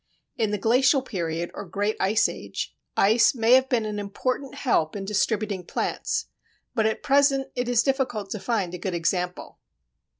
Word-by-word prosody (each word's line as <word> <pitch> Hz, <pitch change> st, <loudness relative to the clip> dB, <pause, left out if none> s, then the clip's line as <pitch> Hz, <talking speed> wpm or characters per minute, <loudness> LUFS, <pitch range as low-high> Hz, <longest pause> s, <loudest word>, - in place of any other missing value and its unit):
In 225 Hz, -4 st, 0 dB
the 210 Hz, -, -1 dB
Glacial 255 Hz, +6 st, +3 dB
period 170 Hz, -7 st, -3 dB
or -, -, -6 dB
Great 205 Hz, +3 st, -2 dB
Ice 210 Hz, +4 st, +3 dB
Age, -, -, -6 dB, 0.2 s
ice 225 Hz, +5 st, +4 dB
may 230 Hz, 0 st, +4 dB
have 260 Hz, +1 st, +5 dB
been 235 Hz, -5 st, +1 dB
an 210 Hz, -1 st, -3 dB
important 255 Hz, +7 st, -3 dB
help 165 Hz, -, +1 dB
in 195 Hz, -1 st, -4 dB
distributing 205 Hz, -1 st, -1 dB
plants, 450 Hz, -, -2 dB, 0.5 s
but 220 Hz, -1 st, +2 dB
at 220 Hz, -, -2 dB
present 275 Hz, -1 st, +3 dB
it 245 Hz, 0 st, -1 dB
is 240 Hz, -2 st, +3 dB
difficult 260 Hz, -7 st, -1 dB
to 215 Hz, -, -3 dB
find 195 Hz, -6 st, -1 dB
a 180 Hz, -, -5 dB
good 185 Hz, 0 st, -3 dB
example. 180 Hz, +1 st, -2 dB
220 Hz, 170 wpm, -25 LUFS, 195-255 Hz, 0.5 s, have